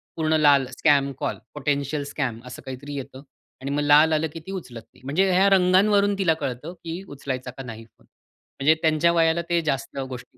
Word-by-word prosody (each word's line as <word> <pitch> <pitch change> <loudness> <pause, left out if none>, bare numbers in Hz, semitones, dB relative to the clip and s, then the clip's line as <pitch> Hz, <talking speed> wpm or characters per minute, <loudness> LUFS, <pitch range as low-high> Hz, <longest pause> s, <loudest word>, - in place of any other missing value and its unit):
पूर्ण 160 -1 0
लाल 145 -3 +5
scam 140 -3 +3
call, - - -2 0.2
potential 145 0 -2
scam 125 -7 -3
असं 125 0 -9
काहीतरी 135 +2 -7
येतं. 135 0 -8 0.4
आणि 140 +1 -4
मग 145 - 0
लाल 150 +2 +5
आलं, 155 +1 +1
की 165 - -7
ती - - -5
उचलत 130 -12 -7
नाही. - - -22
म्हणजे 180 +8 +1
ह्या 190 +2 +4
रंगांवरून 195 +2 +4
तिला 185 -5 +2
कळतं, 135 +7 -4
की 170 +2 -5
उचलायचा 130 -3 -5
का 135 - -6
नाही? 115 -2 -9 0.7
म्हणजे 150 +3 +5
त्यांच्या 160 +1 +3
वयाला 165 0 +2
ते 170 -1 +2
जास्त 140 -2 -3
गोष्टी 125 0 -10
150 Hz, 185 wpm, -24 LUFS, 135-170 Hz, 0.7 s, लाल